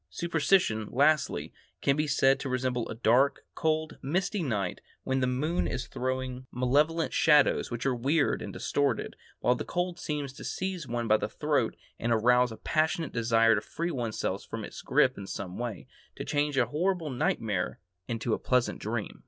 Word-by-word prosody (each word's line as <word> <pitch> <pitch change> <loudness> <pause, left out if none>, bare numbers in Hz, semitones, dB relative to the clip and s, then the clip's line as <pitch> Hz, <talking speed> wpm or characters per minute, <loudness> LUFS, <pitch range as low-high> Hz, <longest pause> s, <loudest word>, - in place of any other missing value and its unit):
Superstition, 165 - +1
lastly, 150 +3 +2 0.3
can 140 - +2
be 150 +1 0
said 135 -1 +3
to 135 - -4
resemble 125 -2 -1
a - - -4
dark, 125 +5 +3
cold, 155 -1 -1
misty 185 +7 -1
night, 105 - -2 0.2
when 130 0 0
the 130 - +1
moon 150 +7 0
is 125 - -3
throwing 130 0 -3
malevolent 145 +7 +1
shadows 150 -2 +4
which 120 0 -4
are 135 - +2
weird 140 +6 +1
and - - -5
distorted, 145 -1 -1 0.3
while 125 - +4
the 125 - -4
cold 175 0 -2
seems 145 -4 -3
to - - -10
seize 185 -5 -3
one 120 -1 -2
by 110 0 +5
the - - -3
throat - - 0 0.2
and 120 - -1
arouse 125 +2 +4
a 110 - -8
passionate 160 +1 0
desire 115 -1 +4
to 100 - +1
free 170 +9 -3
one's 120 -6 -3
self - - -2
from - - -6
its - - -9
grip - - +2
in 100 - -7
some 95 0 -6
way, 120 -7 -4 0.3
to - - -6
change 145 -1 0
a 125 - +4
horrible 165 - -1
nightmare 110 -6 -1 0.3
into 115 -1 -1
a - - 0
pleasant 125 -1 +1
dream. - - -4
130 Hz, 180 wpm, -29 LUFS, 120-155 Hz, 0.3 s, by